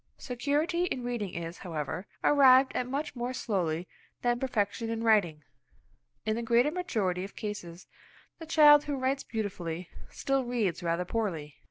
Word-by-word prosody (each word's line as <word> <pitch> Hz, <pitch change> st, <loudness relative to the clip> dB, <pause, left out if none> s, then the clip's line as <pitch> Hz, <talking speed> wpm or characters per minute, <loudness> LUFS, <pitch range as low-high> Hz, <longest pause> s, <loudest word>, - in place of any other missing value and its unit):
Security 290 Hz, +8 st, 0 dB
in 260 Hz, -8 st, -3 dB
reading 235 Hz, -6 st, -3 dB
is, 170 Hz, +1 st, -5 dB
however, 160 Hz, 0 st, -4 dB, 0.2 s
arrived 265 Hz, -2 st, +6 dB
at 250 Hz, -, -1 dB
much 280 Hz, +2 st, -3 dB
more 245 Hz, +1 st, -3 dB
slowly 180 Hz, -8 st, -1 dB, 0.4 s
than 240 Hz, 0 st, +1 dB
perfection 225 Hz, -2 st, -1 dB
in 225 Hz, 0 st, -2 dB
writing. 185 Hz, -9 st, +3 dB, 0.8 s
In 215 Hz, 0 st, +1 dB
the 235 Hz, -, -2 dB
greater 235 Hz, +5 st, +3 dB
majority 215 Hz, -, -1 dB
of 195 Hz, -, -9 dB
cases 185 Hz, -5 st, -6 dB, 0.5 s
the 325 Hz, -, -9 dB
child 295 Hz, -2 st, +7 dB
who 290 Hz, -1 st, -2 dB
writes 265 Hz, +1 st, 0 dB
beautifully, 180 Hz, -6 st, -4 dB, 0.2 s
still 275 Hz, -1 st, -1 dB
reads 230 Hz, -8 st, -1 dB
rather 170 Hz, +1 st, -1 dB
poorly. 170 Hz, -9 st, -3 dB
230 Hz, 150 wpm, -29 LUFS, 180-265 Hz, 0.8 s, child